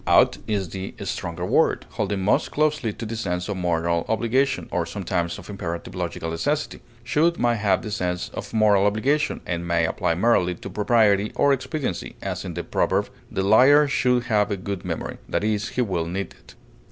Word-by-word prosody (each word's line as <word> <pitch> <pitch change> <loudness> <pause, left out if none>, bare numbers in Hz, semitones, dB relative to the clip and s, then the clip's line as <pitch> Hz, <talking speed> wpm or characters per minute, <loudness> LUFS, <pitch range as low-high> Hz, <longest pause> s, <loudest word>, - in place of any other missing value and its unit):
Ought - - +5
is 100 -5 -1
the 95 +2 -6
stronger 85 +1 -4
word, - - +2
holding 100 -1 -2
most 95 - +2
closely 150 -6 +1
to 115 - -7
the 115 +1 -4
sense 90 -5 -2
of 100 - -2
moral 85 -1 0
obligation, 120 +5 +1
or - - 0
sometimes 85 0 -2
of - - -11
imperative 85 -4 -5
logical 80 - -4
necessity; 145 - -2 0.2
should 160 +8 +2
may 120 -1 +2
have 105 -2 +1
the 110 - -5
sense 90 -3 -2
of - - -7
moral 105 -3 +4
obligation 135 +9 0
or 85 -1 -1
may 85 -1 +1
apply 85 - 0
merely 90 -3 +2
to 95 - -9
propriety 105 0 +3
or 140 0 +4
expediency, 130 - -3
as - - -4
in - - -6
the - - -3
proverb, - - 0 0.2
"The 95 - -2
liar 135 +9 +6
should 125 -3 +2
have 105 -3 +1
a 100 - -1
good 95 0 -5
memory," - - -4
i. - - +1
e., 110 0 +2
he 115 +4 -2
will 90 -7 -2
need 95 +3 -4
it. - - -19
105 Hz, 190 wpm, -24 LUFS, 90-120 Hz, 0.2 s, liar